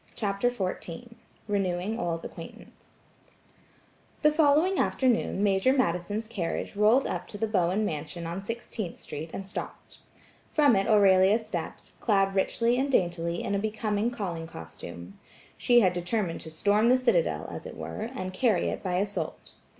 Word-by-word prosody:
CHAPTER 200 +2 0
XIV 195 -1 -5 0.4
RENEWING 195 +1 -1
OLD 165 -3 -2
ACQUAINTANCE - - -12 1.2
The 300 - +6
following 310 +5 +3
afternoon 240 -5 +1
Major 200 +5 +3
Madison's 205 -2 0
carriage 195 -4 -3
rolled 215 +6 +4
up 180 0 -3
to 205 - -7
the 225 - 0
Bowen 195 0 +1
mansion 160 0 -4
on 170 +3 -4
Sixteenth 220 -3 -5
Street, 160 +3 -7
and 195 - -6
stopped. - - -8 0.5
From 290 -6 +5
it 195 0 +1
Aurelia 200 -1 +5
stepped, 200 -8 -6
clad 195 -3 +2
richly 230 +5 +1
and 275 +1 0
daintily 170 -5 0
in - - -2
a 200 - +1
becoming 215 +1 -1
calling 180 -9 -4
costume. 85 - -10 0.4
She 240 -1 +4
had 185 -4 +3
determined 180 0 -2
to 160 - -7
storm 205 +8 +2
the 255 - +6
citadel, 485 - +1
as - - -7
it - - -9
were, 220 +2 -5
and 185 -5 -4
carry 210 -3 +2
it - - -4
by 180 -2 -2
assault. 200 +2 -3
200 Hz, 150 wpm, -28 LUFS, 175-230 Hz, 1.2 s, The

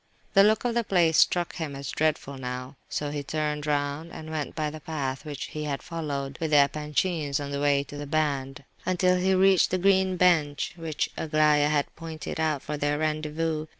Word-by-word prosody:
The 195 - +7
look 215 +3 +3
of 240 - +1
the 235 0 +1
place 170 -6 +3
struck 175 -1 +2
him 155 -5 -4
as 140 0 -5
dreadful 145 -3 -1
now: 125 +1 -5
so 145 -1 -2
he 145 -1 -3
turned 150 +1 -2
round 145 +2 -1
and 155 0 -8
went 155 -2 -3
by 155 -2 -1
the 155 - -8
path 140 -4 -4
which 145 -2 -5
he 150 0 -5
had 140 -2 -3
followed 145 -5 -4
with 160 - 0
the 150 - +5
Epanchins 150 0 -1
on 140 -1 -5
the 140 0 -2
way 140 -1 +3
to 145 +1 -10
the 145 0 -6
band, 140 -3 -1 0.2
until 180 0 +2
he 190 +1 +2
reached 190 -1 +5
the 185 - +1
green 190 0 +3
bench 160 -5 +2
which 165 -3 -3
Aglaya 150 -1 +3
had 145 -2 0
pointed 160 -1 -6
out 155 -3 0
for 150 - -4
their 145 0 0
rendezvous. 155 +1 -1
155 Hz, 200 wpm, -27 LUFS, 145-165 Hz, 0.2 s, The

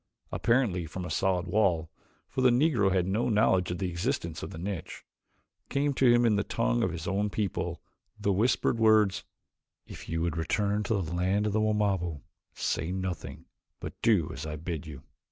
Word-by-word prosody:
Apparently 110 -9 +1
from 90 +3 -6
a - - -5
solid 95 -2 +1
wall, 85 -4 +1 0.4
for - - -3
the 130 - +6
Negro 120 -6 +3
had 90 -2 +2
no 105 +6 0
knowledge 105 -4 +3
of 90 - -2
the 95 - -2
existence 85 -1 -2
of - - -5
the - - -9
niche, 90 0 -5 0.7
came 140 +1 +1
to 130 -2 +4
him 120 0 +4
in 110 -3 +3
the 100 - +1
tongue - - 0
of - - +2
his 85 +1 -6
own 100 +1 0
people, 100 -3 -3 0.4
the 100 - +1
whispered 115 +3 +1
words: 105 -3 +4 0.6
"If - - -10
you 80 0 -1
would 85 -1 -1
return 100 +5 0
to 110 - +1
the 80 +1 -5
land 95 +4 +1
of 105 - 0
the 110 - +2
Wamabo 100 -8 0 0.3
say 85 - -1
nothing, 95 -2 -5 0.3
but - - -6
do 100 -9 +3
as 70 - -6
I 75 -1 -4
bid 80 0 -5
you." 70 -3 -9
95 Hz, 190 wpm, -29 LUFS, 85-110 Hz, 0.7 s, the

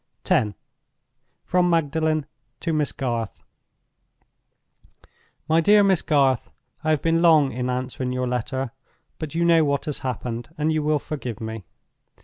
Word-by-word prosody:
X. 105 -1 +2 0.9
From 180 0 +2
Magdalen 160 -2 +1 0.4
to 165 - -1
Miss 150 -2 0
Garth. 120 -5 -3 2.1
"MY 160 +1 +4
DEAR 205 +4 +6
MISS 190 -4 +3
GARTH, 135 -5 +2 0.3
"I 155 - 0
have 155 -2 +1
been 165 0 +2
long 155 -5 +5
in 125 +2 -3
answering 125 0 -3
your 125 0 -1
letter; 125 +1 -2 0.5
but 155 -1 -5
you 170 +1 +2
know 165 -1 +5
what 140 -1 0
has 150 - -3
happened, 120 -1 -4
and 155 +1 +1
you 155 -1 +1
will 150 0 +2
forgive 130 -6 -5
me. 110 -3 -6
145 Hz, 140 wpm, -24 LUFS, 125-160 Hz, 2.1 s, DEAR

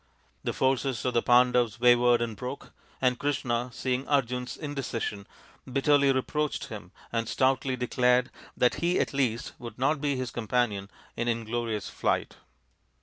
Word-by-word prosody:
The - - -1
forces 130 -1 0
of 125 - +1
the 120 - +3
Pandavs 120 -3 +3
wavered 120 0 +5
and 115 -2 -4
broke, 125 +6 -7 0.3
and 125 -1 +2
Krishna, 125 -4 -1
seeing 130 +2 -2
Arjun's 125 -3 0
indecision, 120 -8 -4 0.4
bitterly 140 +1 +4
reproached 150 +3 -1
him - - -8 0.2
and 115 -1 -1
stoutly 130 0 +1
declared 125 0 +2 0.3
that 125 - +3
he 175 +1 +2
at - - 0
least 125 -5 -1
would 115 -2 -8
not 140 +3 +1
be 145 -2 0
his 130 -2 -3
companion 110 -4 -1 0.3
in 120 - -2
inglorious 115 -2 -2
flight. - - -1
125 Hz, 145 wpm, -28 LUFS, 120-135 Hz, 0.4 s, wavered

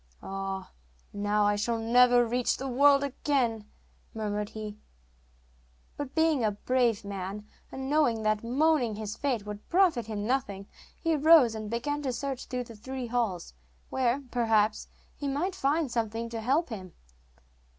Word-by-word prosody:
'Ah, 195 0 -5 0.4
now 205 +1 +1
I 205 0 +3
shall 230 +3 -1
never 245 +2 +5
reach 245 +1 0
the 270 - -4
world 280 +2 +5
again,' 250 -6 -1 0.5
murmured 210 -1 -2
he; 215 -1 -7 1.2
but 285 -2 -6
being 320 -5 +3
a 215 - +3
brave 230 0 0
man, 200 +1 -5 0.3
and 265 0 -5
knowing 270 -7 +2
that 215 0 +1
moaning 255 -2 +2
his 215 0 -5
fate 245 -7 -1
would 210 0 -8
profit 340 - +3
him 210 -2 -3
nothing, 215 -6 -1 0.3
he 330 -1 +1
rose 300 -5 +6
and 215 -1 -5
began 290 +6 -2
to 270 -3 -1
search 265 +1 -4
through 250 -1 -3
the 230 -1 -12
three 260 +4 -6
halls, 225 - -2 0.4
where, 260 +2 +1
perhaps, 225 -3 +2 0.3
he 285 - -4
might 305 +8 -1
find 300 -5 0
something 230 0 -2
to 230 -1 -5
help 275 +8 +1
him. 185 -6 -7
235 Hz, 150 wpm, -29 LUFS, 210-275 Hz, 1.2 s, rose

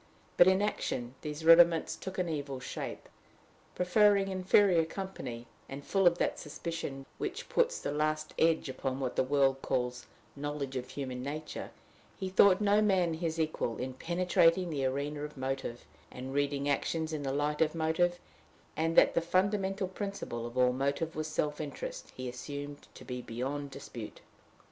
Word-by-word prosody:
But 175 - +7
in 190 +2 +4
action 125 -11 -2
these 150 +1 -5
rudiments 165 0 +6
took 190 0 -7
an 180 -1 0
evil 140 -4 -3
shape. - - -6 0.7
Preferring 195 +2 +4
inferior 185 -2 +4
company, 160 -10 -6 0.2
and 140 +1 -7
full 195 -2 +3
of 170 0 +4
that - - 0
suspicion 150 -3 -5
which - - -4
puts 485 0 +2
the - - -3
last 155 +1 -1
edge 160 -2 +3
upon 130 0 -3
what 130 -2 -2
the - - +3
world 135 0 +2
calls 125 -1 -2 0.3
knowledge 145 -1 -4
of 125 0 -4
human 130 -3 -5
nature, 150 +3 -5 0.5
he 190 -2 -3
thought 190 0 +6
no 205 0 +4
man 185 -5 +3
his 165 0 -2
equal 155 -7 -1
in 130 +1 -4
penetrating 175 +3 +2
the 140 -3 -1
arena 140 +3 -2
of 150 -1 -6
motive, 130 -2 -4 0.2
and 130 +1 -7
reading 140 0 0
actions 160 +3 0
in 155 - -2
the 135 -1 -2
light 145 +2 0
of 160 0 +2
motive; 165 +2 +1 0.6
and, 165 +1 0
that - - +6
the 170 - +2
fundamental 190 +2 +1
principle 190 - -5
of 120 +1 -9
all 125 0 +4
motive 140 +5 -1
was 155 0 -2
self 150 -1 -1
interest, - - -6
he 130 0 -5
assumed 145 +3 -7
to - - -11
be 125 -1 -5
beyond 135 +5 -4
dispute. 125 -5 -9
150 Hz, 165 wpm, -31 LUFS, 135-175 Hz, 0.7 s, But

